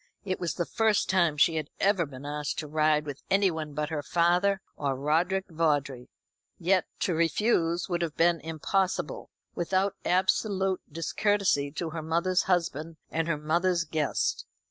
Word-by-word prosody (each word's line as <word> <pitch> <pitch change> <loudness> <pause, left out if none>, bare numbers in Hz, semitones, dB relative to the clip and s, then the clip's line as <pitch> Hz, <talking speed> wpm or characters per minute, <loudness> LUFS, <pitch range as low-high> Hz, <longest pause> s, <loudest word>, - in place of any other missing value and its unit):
It 185 -1 -2
was 175 -2 -2
the 175 - -1
first 220 0 +1
time 170 -5 +2
she 160 +2 +4
had 155 -2 -3
ever 195 -5 +2
been 135 0 -10
asked 150 0 -3
to 155 - -4
ride 155 0 +2
with 145 -2 -7
anyone 160 -7 +1
but 150 0 -2
her 155 -2 -2
father 175 +6 +2 0.2
or 140 -2 -1
Roderick 170 +8 +1
Vawdrey. 145 -6 0 0.5
Yet 185 +1 +2 0.2
to 180 - +1
refuse 170 0 +1
would 175 -2 -1
have 165 -3 -3
been 170 0 +3
impossible, 165 +5 -2 0.2
without 190 +3 0
absolute 190 +1 +1
discourtesy 165 -2 +1
to 160 0 -4
her 160 0 -4
mother's 170 +4 +1
husband 165 -3 0
and 165 0 -1
her 165 -3 0
mother's 170 +3 +1
guest. 155 -3 -1
165 Hz, 155 wpm, -28 LUFS, 150-185 Hz, 0.5 s, she